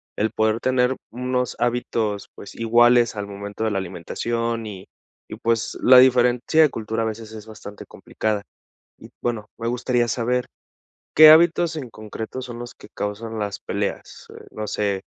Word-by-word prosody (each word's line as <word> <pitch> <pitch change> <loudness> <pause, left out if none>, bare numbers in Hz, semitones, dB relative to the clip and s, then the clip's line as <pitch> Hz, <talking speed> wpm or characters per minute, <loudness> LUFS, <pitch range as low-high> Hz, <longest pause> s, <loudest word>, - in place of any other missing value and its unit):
el 110 +1 0
poder 110 0 +1
tener 130 0 +1 0.2
unos 125 +1 -2
hábitos, 115 -4 -1
pues, 100 - -11
iguales 120 0 +4
al 100 0 -5
momento 100 +1 -6
de 110 - 0
la 100 - 0
alimentación 115 +6 -3
y 95 -3 -9 0.4
y, - - -7
pues, 115 -1 -1
la 130 0 +7
diferencia 125 +3 +4
de 155 - +6
cultura 110 -1 -3
a - - -1
veces 110 0 -6
es 110 -1 -10
bastante 105 -1 -10
complicada. 105 -2 -3 0.5
Y - - -14
bueno, 115 -4 -3
me 115 - -3
gustaría 120 0 0
saber, 125 +2 -1 0.7
¿qué 155 0 +10
hábitos 165 +1 +5
en 130 -7 -6
concreto 110 +4 -7
son 120 -2 -8
los 120 0 -8
que - - -16
causan 110 +3 -5
las 105 -2 -3
peleas? - - -5
Eh, - - -13
no 110 0 -5
sé, 100 -2 -1
115 Hz, 165 wpm, -22 LUFS, 105-125 Hz, 0.7 s, qué